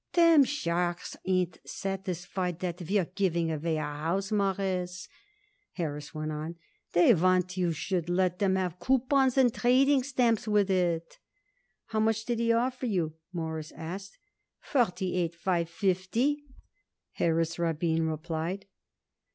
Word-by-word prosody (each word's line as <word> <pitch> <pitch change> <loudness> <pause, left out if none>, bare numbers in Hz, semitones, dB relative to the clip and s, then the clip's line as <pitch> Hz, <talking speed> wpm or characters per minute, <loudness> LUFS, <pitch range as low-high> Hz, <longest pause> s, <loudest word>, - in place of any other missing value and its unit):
"Them 335 -5 +6
sharks 175 -9 -2
ain't 185 -2 +1
satisfied 185 -2 -3
that 180 0 -3
you're 200 -3 +2
giving 170 -3 0
away 160 +1 -1
a - - -1
house, 165 +7 -2
Mawruss," 190 -2 -1 0.7
Harris 150 -4 -4
went 155 0 -4
on. 155 +2 -5 0.4
"They 175 +7 +6
want 185 0 +2
it 180 - -9
you 180 -2 +1
should 175 +2 -2
let 180 0 +1
'em 190 -2 +3
have 180 -2 -2
coupons 265 - +2
and 250 -3 +5
trading 265 +3 +4
stamps 245 -5 +1
with 205 -2 +3
it." 170 -3 0 0.7
"How 220 -1 -2
much 220 0 +1
did 240 -1 -1
he 230 0 +2
offer 250 +2 0
you?" 175 -8 0 0.2
Morris 160 -3 -4
asked. 185 +5 -7 0.4
"Forty 190 - 0
eight 170 -1 -1
five 170 -1 0
fifty," 220 - 0 0.7
Harris 165 0 0
Rabin 165 -1 +1
replied. 165 +4 -3
185 Hz, 135 wpm, -29 LUFS, 170-215 Hz, 0.7 s, Them